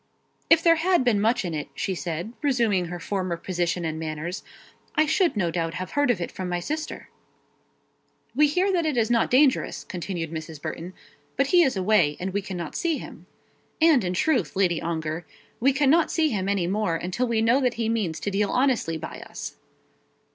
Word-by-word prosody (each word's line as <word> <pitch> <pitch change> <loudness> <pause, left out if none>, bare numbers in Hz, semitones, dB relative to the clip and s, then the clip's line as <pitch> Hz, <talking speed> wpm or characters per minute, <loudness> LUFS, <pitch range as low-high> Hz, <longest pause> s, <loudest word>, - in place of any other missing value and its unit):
"If 330 0 +6
there 330 -1 +5
had 355 -2 +2
been 225 -5 +2
much 230 0 +2
in 170 - -3
it," 150 -2 -4
she 195 - -2
said, 175 +4 -4
resuming 235 -10 +2
her 175 +1 -6
former 185 -1 -2
position 175 0 -2
and 160 0 -3
manners, 160 +3 -4 0.5
"I 310 - +4
should 320 - +2
no 175 -4 +1
doubt 165 -1 -2
have 185 0 -5
heard 285 -2 +1
of 235 -7 +2
it 170 - -4
from 185 -1 -5
my 175 0 -1
sister." 310 - -5 1.3
"We 300 +3 +5
hear 365 +6 +1
that 340 -3 +1
it 295 -5 -1
is 230 0 +2
not 230 -1 +3
dangerous," 265 +1 +3
continued 175 -3 -5
Mrs. 160 -1 -6
Burton; 165 +3 -6 0.4
"but 275 - +3
he 355 - +7
is 265 - +2
away, 185 -6 +3
and 185 +1 -3
we 200 - 0
cannot 180 -5 -6
see 330 -3 0
him. - - -10 0.5
And, 315 -7 +5
in 180 0 -2
truth, 220 - +1
Lady 180 -4 +2
Ongar, 160 0 -3 0.4
we 270 +4 +4
cannot 290 +4 +3
see 315 -2 +2
him 195 -5 -1
any 200 -3 +1
more 195 -2 0
until 185 +9 -2
we 225 -1 +1
know 240 +5 +4
that 250 -2 +1
he 230 -1 -1
means 210 -8 -1
to 205 - -2
deal 200 +1 +1
honestly 250 -11 +1
by 160 +1 -7
us." - - -7
200 Hz, 200 wpm, -25 LUFS, 175-265 Hz, 1.3 s, he